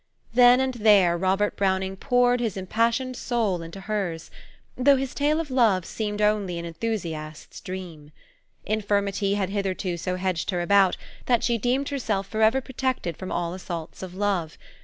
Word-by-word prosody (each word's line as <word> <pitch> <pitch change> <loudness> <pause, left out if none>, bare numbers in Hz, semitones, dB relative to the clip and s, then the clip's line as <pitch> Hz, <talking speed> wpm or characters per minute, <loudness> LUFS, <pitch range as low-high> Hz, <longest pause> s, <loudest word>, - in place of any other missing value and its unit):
Then 245 +1 +7
and 265 0 0
there 205 -6 +4
Robert 190 +3 +1
Browning 190 -1 0
poured 245 +3 +2
his 225 -5 -2
impassioned 230 +6 0
soul 225 -9 -1
into 165 +4 -9
hers; 190 -6 -3 0.4
though 275 +2 +5
his 265 -1 -3
tale 295 +2 +1
of 315 -4 -4
love 220 -9 +3
seemed 210 -1 -3
only 205 -4 +1
an 170 - -5
enthusiast's 165 -5 -5
dream. 170 -5 -8 0.5
Infirmity 200 -1 0
had 195 -2 -1
hitherto 190 -3 -2
so 180 +2 -2
hedged 185 -2 -2
her 180 -3 0
about, 195 0 +4 0.3
that 240 -2 +3
she 235 -1 +1
deemed 255 +5 0
herself 220 -8 -1
forever 220 +5 +2
protected 260 - -2
from 185 +3 -7
all 175 0 -2
assaults 175 -3 -7
of 185 -1 -7
love. 190 -5 -1
200 Hz, 160 wpm, -25 LUFS, 185-235 Hz, 0.5 s, Then